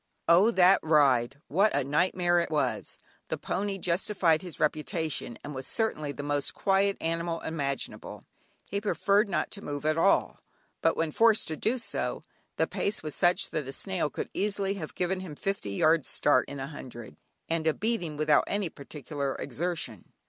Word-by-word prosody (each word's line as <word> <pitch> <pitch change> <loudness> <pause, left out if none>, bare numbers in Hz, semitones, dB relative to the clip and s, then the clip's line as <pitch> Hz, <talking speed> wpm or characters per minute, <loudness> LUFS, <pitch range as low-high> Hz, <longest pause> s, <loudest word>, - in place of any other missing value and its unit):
Oh! 180 +6 +6
that 190 -4 +5
ride 140 -4 +3
what 195 +5 +3
a 145 - +2
nightmare 175 +4 +2
it 170 - -1
was! 155 -2 -1 0.3
The - - -2
pony 200 0 -2
justified 175 -2 +1
his 175 -4 -9
reputation, 155 -4 -1
and 150 - -6
was 130 -1 -6
certainly 155 -10 -1
the 145 - -6
most 145 -1 -1
quiet 195 0 +2
animal 165 0 -2
imaginable. 140 -4 -4 0.4
He 200 +1 -3
preferred 205 0 +2
not 180 - -1
to 200 - -5
move 145 0 -5
at 155 +1 +2
all, 195 - +2 0.4
but 165 - +2
when 160 -1 0
forced 225 +4 +4
to 160 - -2
do 225 - 0
so, 240 - -3 0.3
the - - +2
pace 200 - -2
was 155 -2 -3
such 175 -1 +2
that 150 -4 -2
a - - -4
snail 180 0 -1
could - - -5
easily 200 -1 0
have 170 -6 -7
given 185 +1 -1
him 180 -5 -7
fifty 195 - -3
yards 155 +6 +3
start 130 - +2
in 140 - -6
a 135 - -3
hundred, 120 - -9 0.3
and 165 -1 -1
a 160 - +4
beating, 200 -9 -1
without 150 -1 +3
any 200 -3 -1
particular 140 -1 -5
exertion. 145 - -4
165 Hz, 175 wpm, -28 LUFS, 145-195 Hz, 0.4 s, Oh